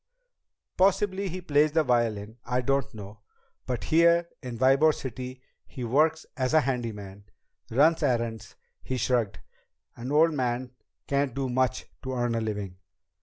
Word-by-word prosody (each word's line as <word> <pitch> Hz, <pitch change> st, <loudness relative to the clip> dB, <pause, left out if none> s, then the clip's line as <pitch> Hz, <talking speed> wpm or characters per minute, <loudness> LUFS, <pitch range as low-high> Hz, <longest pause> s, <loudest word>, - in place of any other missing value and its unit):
"Possibly 195 Hz, +1 st, +2 dB
he 185 Hz, +2 st, -5 dB
plays 150 Hz, -2 st, +2 dB
the 160 Hz, -1 st, +3 dB
violin. 115 Hz, -3 st, 0 dB
I 125 Hz, +1 st, -1 dB
don't 135 Hz, +1 st, 0 dB
know. 105 Hz, 0 st, -10 dB, 0.5 s
But 125 Hz, -2 st, -2 dB
here 170 Hz, +1 st, +4 dB
in 125 Hz, -4 st, -6 dB
Ybor 135 Hz, +5 st, +4 dB
City 130 Hz, 0 st, -7 dB, 0.2 s
he 125 Hz, -, -7 dB
works 155 Hz, +6 st, +2 dB
as 130 Hz, +2 st, 0 dB
a 155 Hz, -, +7 dB
handyman. 105 Hz, -7 st, -4 dB, 0.4 s
Runs 155 Hz, +8 st, +4 dB
errands." 115 Hz, -6 st, -1 dB, 0.3 s
He 130 Hz, -, -3 dB
shrugged. 120 Hz, -3 st, 0 dB, 0.6 s
"An 125 Hz, +3 st, -6 dB
old 160 Hz, +2 st, +4 dB
man 125 Hz, -2 st, -2 dB, 0.3 s
can't 140 Hz, -2 st, 0 dB
do 135 Hz, -1 st, -2 dB
much 130 Hz, +1 st, 0 dB, 0.2 s
to 130 Hz, -1 st, -4 dB
earn 120 Hz, -1 st, 0 dB
a 115 Hz, -, 0 dB
living." 105 Hz, -4 st, -4 dB
130 Hz, 145 wpm, -27 LUFS, 115-150 Hz, 0.6 s, a